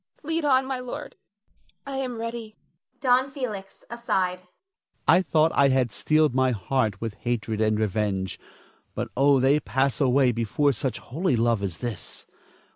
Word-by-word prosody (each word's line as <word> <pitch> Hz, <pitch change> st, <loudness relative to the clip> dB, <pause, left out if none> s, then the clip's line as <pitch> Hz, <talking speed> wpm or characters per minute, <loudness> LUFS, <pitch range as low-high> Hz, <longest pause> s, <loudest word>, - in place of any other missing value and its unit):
Lead 320 Hz, +2 st, -1 dB
on, 265 Hz, -2 st, +4 dB
my 265 Hz, -1 st, -3 dB
lord, 250 Hz, -1 st, -7 dB, 0.7 s
I 275 Hz, -1 st, -4 dB
am 255 Hz, -3 st, -3 dB
ready. 230 Hz, -1 st, -6 dB, 0.5 s
Don 255 Hz, 0 st, +3 dB
Felix 215 Hz, -8 st, -6 dB
[aside]. 195 Hz, -7 st, -1 dB, 0.7 s
I 180 Hz, -, +6 dB
thought 160 Hz, -1 st, +2 dB
I 140 Hz, -, +5 dB
had 130 Hz, -3 st, +2 dB
steeled 155 Hz, +1 st, +2 dB
my 130 Hz, 0 st, +3 dB
heart 110 Hz, -1 st, -1 dB
with 115 Hz, -2 st, -4 dB
hatred 115 Hz, -3 st, -2 dB
and 110 Hz, -1 st, +2 dB
revenge; 100 Hz, -2 st, -1 dB, 0.6 s
but -, -, -3 dB
oh, 140 Hz, +1 st, +4 dB
they 135 Hz, +3 st, +4 dB
pass 135 Hz, -2 st, 0 dB
away 130 Hz, -1 st, +4 dB
before 120 Hz, +5 st, +1 dB
such 130 Hz, +2 st, -3 dB
holy 155 Hz, +2 st, -1 dB
love 115 Hz, -2 st, +2 dB
as 95 Hz, -5 st, -3 dB
this. 120 Hz, +3 st, -6 dB
140 Hz, 150 wpm, -25 LUFS, -, 0.7 s, I